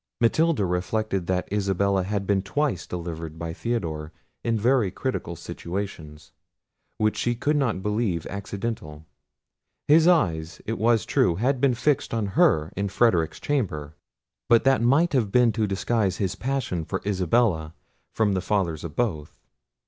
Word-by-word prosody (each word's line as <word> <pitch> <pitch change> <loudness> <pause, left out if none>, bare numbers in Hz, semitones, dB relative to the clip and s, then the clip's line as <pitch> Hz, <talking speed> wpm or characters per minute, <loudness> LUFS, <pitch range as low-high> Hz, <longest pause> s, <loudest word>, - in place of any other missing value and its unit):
Matilda 145 0 +2
reflected 95 +1 -1
that 90 0 0
Isabella 100 -1 +1
had 100 +1 -2
been 100 -1 +2
twice 125 - -1
delivered 80 -2 -6
by 80 0 -5
Theodore 80 -9 -3 0.3
in 115 -1 +1
very 120 -1 +2
critical 95 -4 -3
situations, 85 -2 -6 0.7
which 110 0 +1
she 120 0 0
could 145 +6 0
not 120 -10 0
believe 105 -6 -1
accidental. 100 -5 -5 0.8
His 160 +3 +6
eyes, 85 - +2
it 115 - -3
was 115 -2 +3
true, 85 - +2
had 125 +6 0
been 135 -3 +3
fixed 135 -1 0
on 110 -2 0
her 140 - +3
in 100 +1 -1
Frederic's 90 -8 +2
chamber; 80 - -2 0.5
but 115 -1 +5
that 135 -3 +3
might 145 +8 +3
have 115 -7 +1
been 125 0 +4
to 110 -1 0
disguise 95 0 0
his 95 -3 -1
passion 125 -10 -2
for 95 +4 -4
Isabella 90 -4 +1 0.4
from 105 -3 +1
the 95 - 0
fathers 90 -5 -1
of 85 -3 -7
both. 80 -11 -2
100 Hz, 150 wpm, -25 LUFS, 85-120 Hz, 0.8 s, His